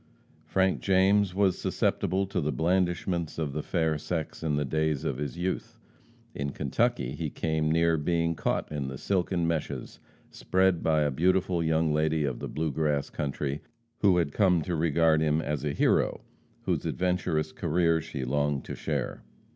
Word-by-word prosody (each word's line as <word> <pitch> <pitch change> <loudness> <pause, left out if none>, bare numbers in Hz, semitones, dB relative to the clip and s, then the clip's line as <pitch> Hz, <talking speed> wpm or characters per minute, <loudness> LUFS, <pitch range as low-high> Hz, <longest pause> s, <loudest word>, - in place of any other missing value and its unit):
Frank 95 0 +1
James 95 0 +3
was 95 -2 +2
susceptible 95 +1 0
to 95 -2 -2
the 75 0 0
blandishments 85 -1 0
of 75 -4 -2
the 75 - -2
fair 80 -2 0
sex 80 0 -4
in 80 -2 0
the 75 0 0
days 80 0 0
of - - -1
his 70 -4 -4
youth. 90 +2 -3 0.6
In 70 0 -3
Kentucky, 60 - 0
he 75 +2 -3
came 80 +1 -1
near 85 0 +3
being 85 +2 +1
caught 80 - -2
in 75 -3 -3
the 65 0 -5
silken 90 -1 0
meshes 75 -5 -3 0.3
spread 95 -2 +1
by 80 -1 +2
a 75 -1 +1
beautiful 90 +3 +1
young 80 -1 +2
lady 80 0 +1
of 65 -3 -3
the - - -4
"Blue 80 0 -2
Grass" 75 -1 0
country, 70 0 -3 0.4
who 95 -4 +4
had 85 -5 +1
come 90 -5 +3
to 90 - -2
regard 80 0 +3
him 75 0 +2
as 75 -3 -2
a 75 - 0
hero, - - +2 0.4
whose - - -1
adventurous 90 -4 0
career 85 -1 +1
she 75 -4 -5
longed 70 +1 0
to - - -6
share. - - -3
80 Hz, 170 wpm, -28 LUFS, 75-90 Hz, 0.6 s, who